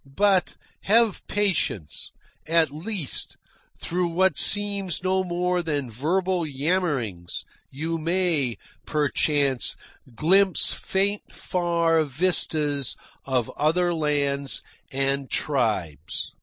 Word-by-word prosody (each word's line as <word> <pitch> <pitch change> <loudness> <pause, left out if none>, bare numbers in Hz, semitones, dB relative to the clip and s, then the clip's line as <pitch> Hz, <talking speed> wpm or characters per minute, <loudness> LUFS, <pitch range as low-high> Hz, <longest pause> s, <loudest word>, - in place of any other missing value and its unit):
But 190 +7 +1 0.3
have 225 0 +3
patience. 190 - -1 0.4
At 165 -2 +3
least, 170 0 -4 0.4
through 180 +1 -1
what 180 0 +2
seems 200 -2 +4
no 190 0 +1
more 180 0 -1
than 145 -7 -3
verbal 175 - 0
yammerings, 140 - -2 0.2
you 160 +4 -3
may, 165 -7 +1 0.3
perchance, 145 -3 +1 0.4
glimpse 190 - +4
faint 200 +2 -2
far 170 -2 +1
vistas 150 -2 +1 0.3
of 130 -4 -1
other 175 +3 +1
lands 140 -3 -1 0.3
and 135 0 -1
tribes. 105 - -2
165 Hz, 90 wpm, -24 LUFS, 140-185 Hz, 0.4 s, seems